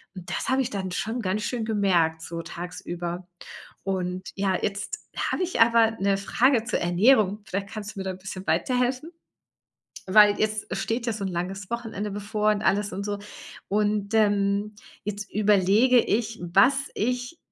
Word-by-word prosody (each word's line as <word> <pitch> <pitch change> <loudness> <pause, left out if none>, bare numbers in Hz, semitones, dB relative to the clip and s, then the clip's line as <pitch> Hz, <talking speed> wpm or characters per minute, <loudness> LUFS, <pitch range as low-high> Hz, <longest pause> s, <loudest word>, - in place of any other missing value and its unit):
und 180 -2 -9
das - - -3
habe 265 0 +3
ich 255 - -5
dann 190 -2 -3
schon 225 +6 -3
ganz 210 +1 -1
schön 235 -1 -2
gemerkt 175 -7 +1
so 170 0 -5
tagsüber. 175 +1 -6 0.6
Und 185 -1 -3
ja, 195 -2 +1
jetzt 200 0 -3 0.2
habe - - -1
ich 360 -7 -1
aber 230 -1 +5
'ne 195 0 +2
Frage 240 +4 +2
zur 240 - -1
Ernährung. 205 +3 +3
Vielleicht 195 +1 -4
kannst 215 +1 -7
du - - -6
mir 190 - -4
da 190 - -2
bisschen 190 0 -8
weiterhelfen, 250 - 0 1.0
weil 205 +1 +6
jetzt 215 0 0
steht 230 +4 -2
ja 230 - +1
so 205 -2 -4
'n - - -1
langes 185 +3 -4
Wochenende 225 -3 -4
bevor 210 +1 0
und 210 -1 +1
alles 205 -1 +1
und 195 +2 -4
so. 205 0 -3 0.5
Und, 205 0 0
ähm, 205 -1 +2 0.3
jetzt 205 0 -5
überlege 210 +4 +4
ich, 225 0 -1
was 195 +10 +4 0.2
ich 250 +7 -2
205 Hz, 165 wpm, -25 LUFS, 190-225 Hz, 1.0 s, weil